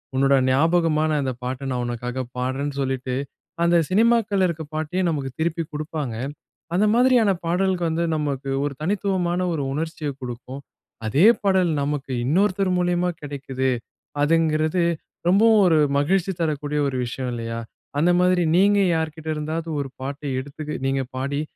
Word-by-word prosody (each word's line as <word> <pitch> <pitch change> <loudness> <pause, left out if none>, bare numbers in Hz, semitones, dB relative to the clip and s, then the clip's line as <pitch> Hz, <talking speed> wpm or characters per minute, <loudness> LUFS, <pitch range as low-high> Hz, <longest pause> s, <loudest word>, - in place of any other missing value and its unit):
உன்னோட 135 +1 +4
ஞாபகமான 155 +2 +2
அந்த 130 -2 -1
பாட்டை 130 +2 -4
நான் 125 -1 -1
உனக்காக 125 +2 -3
பாடுறேன்னு" 135 +3 -2
சொல்லிட்டு 130 -1 -2 0.5
அந்த 170 0 +4
சினிமாக்கள்ல 215 -2 +3
இருக்கிற 160 -3 -5
பாட்டையே 155 +4 -1
நமக்கு 140 -4 -2
திருப்பி 165 +1 0
குடுப்பாங்க. 150 -5 -4 0.6
அந்த 195 +4 +3
மாதிரியான 245 -4 +4
பாடலுக்கு 180 +1 +1
வந்து 165 +1 0
நமக்கு 140 -3 -2
ஒரு 145 -1 -2
தனித்துவமான 185 -1 0
ஒரு 145 - -2
உணர்ச்சியைக் 150 -2 -4
கொடுக்கும். 125 +2 -7 0.4
அதே 140 - +3 0.2
பாடல் 190 -4 +2
நமக்கு 140 -1 -2
இன்னொருத்தர் 190 +5 +2
மூலியமா 180 0 +1
கிடைக்கிது, 135 -2 -3 0.5
அதுங்கிறது 160 +2 +2 0.4
ரொம்பவும் 215 +4 +5
ஒரு 165 -3 +4 0.2
மகிழ்ச்சி 180 +6 +1
தரக்கூடிய 150 -2 -1
ஒரு 135 -2 -2
விஷயம் 125 +1 -4
இல்லையா? 115 -1 -4 0.4
அந்த 165 +4 +3
மாதிரி 180 0 +3
நீங்க 200 +3 +4 0.2
யார்கிட்ட 160 0 -3
இருந்தாவது 160 +2 -3
ஒரு 140 -1 -3
பாட்டை 140 +2 -4
எடுத்து 150 +2 -6
நீங்க 135 0 +1
பாடி, 140 +2 -1
155 Hz, 135 wpm, -23 LUFS, 135-180 Hz, 0.6 s, ரொம்பவும்